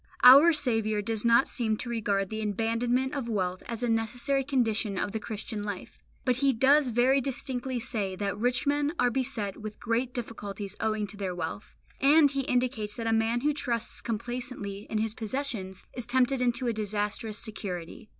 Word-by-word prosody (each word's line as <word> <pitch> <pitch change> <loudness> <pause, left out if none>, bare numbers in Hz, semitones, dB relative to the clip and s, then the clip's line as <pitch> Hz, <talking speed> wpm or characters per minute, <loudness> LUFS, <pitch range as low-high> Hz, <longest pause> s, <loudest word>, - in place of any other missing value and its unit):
Our 275 +7 +10
Saviour 225 -8 +1
does 220 0 -1
not 235 +2 +5
seem 220 -3 -1
to 245 - -6
regard 205 -4 0
the 220 0 -4
abandonment 230 +5 0
of 270 -5 -3
wealth 185 -4 -1
as 230 0 -4
a - - +1
necessary 240 +4 0
condition 225 -7 0
of 205 - -1
the 220 - -3
Christian 215 0 -5
life, 205 -2 -6 0.3
but 250 -2 +2
He 275 +1 +3
does 275 +4 +4
very 250 +3 +3
distinctly 260 -1 -3
say 210 -5 -3
that 200 +1 -2
rich 245 +4 +1
men 290 +1 +1
are 245 0 +3
beset 240 -6 -2
with 215 -1 -8
great 240 +2 0
difficulties 210 -4 -5
owing 215 -1 0
to 205 0 -7
their 190 -3 -3
wealth, 175 +4 -5 0.2
and 290 +1 +6
He 275 -1 -1
indicates 245 -5 -1
that 230 - -5
a 225 - +2
man 225 +2 +1
who 295 +2 +2
trusts 235 -5 -1
complacently 235 -3 -5
in 220 - -1
his 220 0 0
possessions 220 -5 -4
is 245 -2 -5
tempted 260 +1 +2
into 245 +1 +1
a 235 - +1
disastrous 210 0 -2
security. 210 -3 -4
230 Hz, 180 wpm, -28 LUFS, 210-255 Hz, 0.3 s, Our